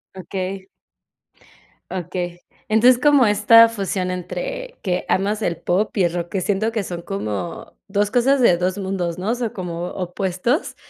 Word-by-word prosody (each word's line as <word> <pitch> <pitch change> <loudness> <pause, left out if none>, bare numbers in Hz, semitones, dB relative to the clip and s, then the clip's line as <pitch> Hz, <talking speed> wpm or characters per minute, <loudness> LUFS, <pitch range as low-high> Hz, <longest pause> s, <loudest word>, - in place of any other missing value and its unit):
Okey. 190 +1 -5 1.2
Okey. 175 -1 -4 0.3
Entonces, 240 +3 +5
como 290 -4 +5
esta 225 +2 +6
fusión 195 -4 -2
entre - - -5
que 180 -2 -1
amas 205 +3 0
el 170 -4 0
pop 185 +8 -1
y 195 - +2
el 170 0 +1
rock, 175 -1 -3
que 190 - -2
siento 210 +4 0
que 215 - -1
son 175 -2 -6
como 170 - -5
2 205 +1 0
cosas 255 +3 +3
de 175 -7 +5
2 185 +2 -1
mundos, 185 -3 -3
¿no? 190 +4 -3
O 240 - +1
sea, 235 -3 -3
como 175 -2 -4
opuestos, 190 - -2
195 Hz, 160 wpm, -21 LUFS, 180-225 Hz, 1.2 s, esta